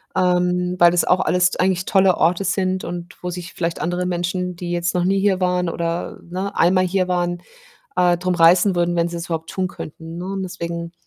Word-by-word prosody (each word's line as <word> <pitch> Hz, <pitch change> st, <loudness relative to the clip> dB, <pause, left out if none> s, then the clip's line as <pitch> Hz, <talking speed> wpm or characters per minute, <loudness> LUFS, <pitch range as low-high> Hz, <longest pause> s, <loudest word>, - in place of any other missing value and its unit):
Ähm, 180 Hz, 0 st, +1 dB
weil 175 Hz, 0 st, +7 dB
das 175 Hz, -, +2 dB
auch 180 Hz, -, +3 dB
alles 180 Hz, 0 st, +2 dB
t -, -, -6 dB
eigentlich 185 Hz, 0 st, +1 dB
tolle 190 Hz, -2 st, +3 dB
Orte 175 Hz, +4 st, +2 dB
sind 185 Hz, -1 st, 0 dB
und 175 Hz, 0 st, -6 dB
wo 180 Hz, -, -3 dB
sich 175 Hz, +1 st, -7 dB
vielleicht 170 Hz, -1 st, -3 dB
andere 175 Hz, +1 st, -1 dB
Menschen, 180 Hz, 0 st, -2 dB
die 175 Hz, 0 st, -5 dB
jetzt 175 Hz, 0 st, -1 dB
noch 180 Hz, -, +1 dB
nie 195 Hz, +1 st, +2 dB
hier 195 Hz, -2 st, +2 dB
waren 180 Hz, -1 st, +1 dB
oder, 170 Hz, +1 st, -3 dB
ne, 185 Hz, +3 st, -5 dB
einmal 185 Hz, +2 st, +3 dB
hier 185 Hz, 0 st, 0 dB
waren, 175 Hz, -1 st, -1 dB, 0.6 s
äh, 175 Hz, -1 st, +4 dB
drum 180 Hz, +1 st, -1 dB
reißen 175 Hz, +3 st, +5 dB
würden, 175 Hz, 0 st, +1 dB
wenn 170 Hz, 0 st, +1 dB
sie's 170 Hz, 0 st, -5 dB
überhaupt 165 Hz, -1 st, -4 dB
tun 185 Hz, -1 st, -2 dB
könnten, 165 Hz, 0 st, -9 dB
ne, 175 Hz, -, -5 dB
und 195 Hz, 0 st, -3 dB
deswegen 170 Hz, -2 st, -5 dB
180 Hz, 210 wpm, -21 LUFS, 170-185 Hz, 0.6 s, weil